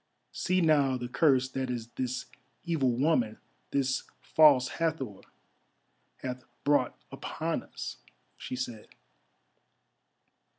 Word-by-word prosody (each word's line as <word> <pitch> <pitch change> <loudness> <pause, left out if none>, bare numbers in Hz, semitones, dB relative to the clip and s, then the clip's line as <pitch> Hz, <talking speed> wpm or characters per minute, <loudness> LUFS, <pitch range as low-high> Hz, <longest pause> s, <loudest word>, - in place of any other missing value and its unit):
"See 185 0 +1
now 145 -5 +4
the 120 -1 -4
curse 130 -1 +3
that 130 0 -2 0.3
this 125 0 -2 0.4
evil 160 -7 +1
woman, 125 -4 +2 0.3
this 135 -2 +1 0.2
False 145 -5 +6
Hathor, 150 - -2 1.0
hath 125 -1 -4 0.2
brought 145 0 +2
upon - - -3
us," - - -7 0.4
she - - -6
said. 120 -4 -5
130 Hz, 95 wpm, -30 LUFS, 125-155 Hz, 1.0 s, False